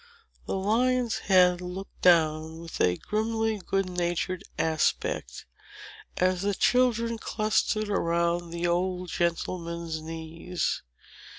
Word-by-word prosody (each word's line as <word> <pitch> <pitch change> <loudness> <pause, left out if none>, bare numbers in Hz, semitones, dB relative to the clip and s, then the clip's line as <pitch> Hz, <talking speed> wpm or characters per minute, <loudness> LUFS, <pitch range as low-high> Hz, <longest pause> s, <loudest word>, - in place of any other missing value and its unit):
The - - -1
lion's 235 +4 +1
head 180 -2 +5
looked 180 +2 -7
down 160 -2 +3
with 165 0 -6
a 90 0 +3
grimly 220 0 -1
good 195 -1 0
natured 180 0 -2
aspect, 155 - -1 0.7
as 185 0 +2
the 200 0 0
children 235 -1 +2
clustered 215 0 0
around 170 -3 0
the 170 +1 -3
old 180 +1 0
gentleman's 170 -1 -2
knees. 165 +2 -3
180 Hz, 105 wpm, -27 LUFS, 170-205 Hz, 0.7 s, head